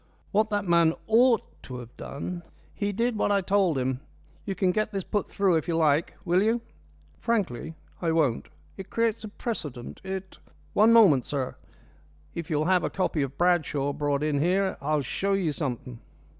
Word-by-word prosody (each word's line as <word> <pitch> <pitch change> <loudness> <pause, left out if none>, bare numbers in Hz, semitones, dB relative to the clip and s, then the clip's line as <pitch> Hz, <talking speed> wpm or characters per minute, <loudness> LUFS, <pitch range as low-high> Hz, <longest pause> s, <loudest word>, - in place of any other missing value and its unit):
What 215 +1 +2
that 205 -1 -1
man 170 -2 +4
ought 230 +1 +4 0.2
to 125 - -8
have 120 -1 -10
done 175 +5 -6 0.2
" - - -30
"He 205 0 -1
did 235 +4 0
what 205 - +1
I 200 -1 +3
told 190 -5 +2
him. 130 0 -1 0.5
You 195 - -3
can 185 -2 +2
get 215 +2 -1
this 195 -2 -3
put 205 +2 -2
through 190 -4 +2
if 160 - -3
you 165 -1 0
like. 155 0 +2
Will 175 +1 +3
you?" 225 +3 +2 0.6
"Frankly, 190 - -1 0.3
I 165 -2 +1
won't. 150 -8 +1 0.3
It 190 -1 -8
creates 230 -1 0
a - - -5
precedent. 155 - -6
It 190 0 -6 0.2
" - - -31
"One 215 +2 +5
moment, 190 - +6
sir. 135 -3 -3 0.8
If 170 0 -5
you'll 155 -1 +1
have 180 0 +3
a - - 0
copy 180 -5 -1
of 135 0 -3
Bradshaw 155 -5 +1
brought 145 0 0
in 150 -2 +1
here 190 +5 +2
I'll 150 0 0
show 195 +10 -1
you 185 -5 +1
something." 125 -5 -4
175 Hz, 185 wpm, -27 LUFS, 145-200 Hz, 0.8 s, moment